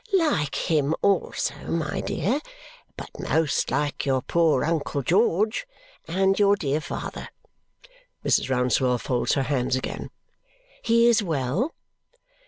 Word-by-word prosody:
"Like 200 - +1
him, 155 -1 +1
also, 200 -2 +1
my 165 -3 -2
dear 245 - -1 0.6
but - - -8
most 160 -3 0
like 145 -1 -1
your 130 -2 0
poor 165 -2 +2
uncle 150 -3 -1
George! 210 - +1 0.4
And 190 +3 +1
your 200 0 +5
dear 150 -4 -1
father." - - -6 1.0
Mrs. - - +2
Rouncewell 125 0 +2
folds 125 0 0
her 135 - +1
hands 130 -2 0
again. 130 - -4 0.7
"He 230 0 +3
is 235 -2 +4
well?" 165 - -1
160 Hz, 120 wpm, -25 LUFS, 135-200 Hz, 1.0 s, your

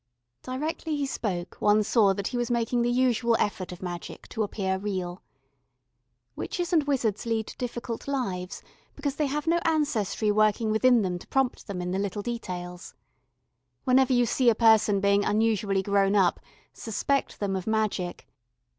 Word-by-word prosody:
Directly 305 +4 -3
he 285 -1 -1
spoke, 190 -9 -4
one 210 +1 +4
saw 210 -2 +4
that 200 0 -4
he - - -6
was 240 0 -1
making 240 0 +1
the 240 - +1
usual 240 -2 +2
effort 190 -3 -2
of 180 +1 -9
magic 175 -1 -7
to 225 - -3
appear 190 -2 -1
real. 185 -3 -4 1.1
Witches 355 0 -3
and 325 - +5
wizards 235 -6 0
lead 225 -1 -1
difficult 240 -1 -5
lives 195 -10 -3 0.3
because 285 -1 -3
they 300 - +1
have 295 +2 -2
no 335 +1 +3
ancestry 285 - +1
working 215 +1 +2
within 235 +1 +4
them 180 -2 -2
to - - -14
prompt 265 -2 0
them 185 -3 -4
in 180 - -3
the 190 - -1
little 200 +1 -3
details. 180 -6 -6 0.9
Whenever 260 0 +4
you 245 -1 +4
see 245 +2 +3
a 225 - +3
person 220 -3 +4
being 200 0 +3
unusually 205 -3 +1
grown 200 0 +2
up, 190 -4 +3 0.3
suspect 275 +5 -2
them 200 -2 -1
of 185 +1 -4
magic. 215 -5 -1
220 Hz, 165 wpm, -27 LUFS, 195-250 Hz, 1.1 s, and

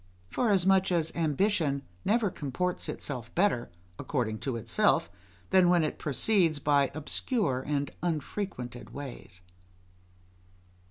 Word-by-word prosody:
Forasmuch 195 -4 +3
as 165 -2 +1
ambition 160 -3 +1 0.2
never 215 -1 +2
comports 175 +6 -2
itself 120 -4 -5
better, 175 -10 +2 0.3
according 110 -6 -2
to 135 -3 -2
itself, 115 - +2 0.4
than 185 -2 +6
when 175 -2 +4
it 155 - -2
proceeds 165 - +2
by 145 -1 +3
obscure 155 - 0
and 145 -1 -1
unfrequented 155 - -4
ways. 120 -10 -8
155 Hz, 105 wpm, -29 LUFS, 135-190 Hz, 0.4 s, than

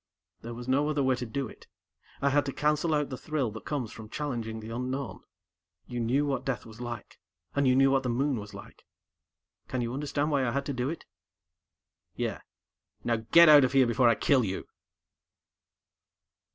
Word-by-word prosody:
"There 115 +1 -7
was 120 +1 -8
no 140 +3 +2
other 145 -2 +1
way 130 0 +3
to 120 0 -4
do 135 +4 -3
it! - - -15 0.6
I 140 - +3
had 145 +1 +3
to - - -1
cancel 150 +3 +1
out 150 -2 -1
the 130 - -4
thrill 145 -7 -1
that 110 - -9
comes 135 -7 -2
from 110 -2 -10
challenging 115 -6 -4
the 110 +1 -8
unknown. 125 +2 -4 0.7
You 120 - -5
knew 125 +5 +1
what 135 -3 -1
death 125 -6 -3
was 110 +1 -12
like, 120 -1 -7 0.4
and 140 -1 +2
you 130 - +4
knew 135 +1 +5
what 135 -1 +3
the 130 - -2
Moon 135 +2 +1
was 105 -1 -9
like. 100 - -13 0.8
Can 130 - -2
you 120 0 -2
understand 145 +2 -1
why 140 -2 +2
I 125 - +1
had 140 +1 -1
to 140 - -2
do 125 +1 -1
it?" 165 - -6 1.1
"Yeah. - - -3 0.6
_Now 115 -2 -1
get 170 0 +8
out 150 -1 +9
before 130 -2 +4
I 115 - +4
kill 135 0 +3
you. 95 -2 -3
130 Hz, 190 wpm, -29 LUFS, 120-140 Hz, 1.1 s, out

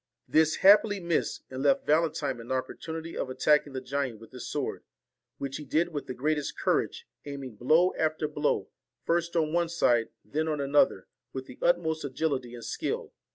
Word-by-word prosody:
This 155 0 +4
happily 205 0 +7
missed, 170 -2 -1
and 130 0 -4
left 140 -1 +3
Valentine 155 -4 +1
an 115 +2 -8
opportunity 160 +5 -4
of - - -2
attack 150 +4 +3
ing 140 - -11
the 130 - -3
giant 135 -3 -2
with 115 - -14
his 125 -1 -7
sword, - - -3 0.5
which 135 -1 -4
he 150 - -7
did 160 +5 +1
with 145 -4 -5
the 130 - -5
greatest 150 +2 -1
courage, - - 0 0.2
aiming 140 -4 -6
blow 160 - +4
after 155 -1 0
blow, 150 0 0 0.4
first 170 0 0
on 155 -2 +1
one 170 -1 +2
side, 120 -9 +2 0.2
then 155 +2 -1
on 155 -2 -1
another, 140 -8 +3 0.3
with 130 0 -5
the 125 - -13
utmost 165 -2 +2
agility 130 -3 -2
and 120 - -9
skill. - - -3
150 Hz, 180 wpm, -29 LUFS, 130-160 Hz, 0.5 s, happily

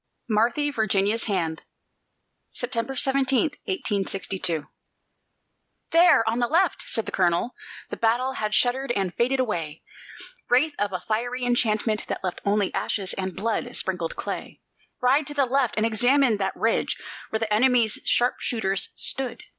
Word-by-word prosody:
MARTHY 240 +7 +1
VIRGINIA'S 215 -2 +1
HAND 170 -6 -1 0.9
[September 245 +1 -3
17, 270 +2 +2 0.2
1862] 195 - -1 1.3
"There, 330 -9 +5
on 230 +2 +1
the 240 - +2
left!" 340 +2 +2
said 225 - 0
the - - -5
colonel; 175 +6 +1 0.4
the - - -4
battle 240 +3 +1
had 215 -3 -1
shuddered 255 +2 +1
and 195 -5 -1
faded 255 +3 +1
away, 165 -11 -2 0.7
Wraith 290 +5 +3
of 205 -1 0
a 185 - -4
fiery 245 +3 -2
enchantment 220 -3 +1
that - - -4
left 185 -2 -3
only 200 -1 +1
ashes 195 -3 -1
and 190 -2 -4
blood 225 +2 -2
sprinkled 180 -3 -1
clay - - -6 0.4
"Ride 270 +3 +3
to 290 - -3
the 280 -2 +3
left 260 -1 +1
and 215 - +2
examine 245 +2 +3
that 195 -1 -2
ridge, 225 +1 0 0.3
where 220 - -1
the 220 -1 -1
enemy's 235 -1 +3
sharpshooters 220 -5 0
stood. 265 -2 -1
225 Hz, 140 wpm, -25 LUFS, 200-255 Hz, 1.3 s, There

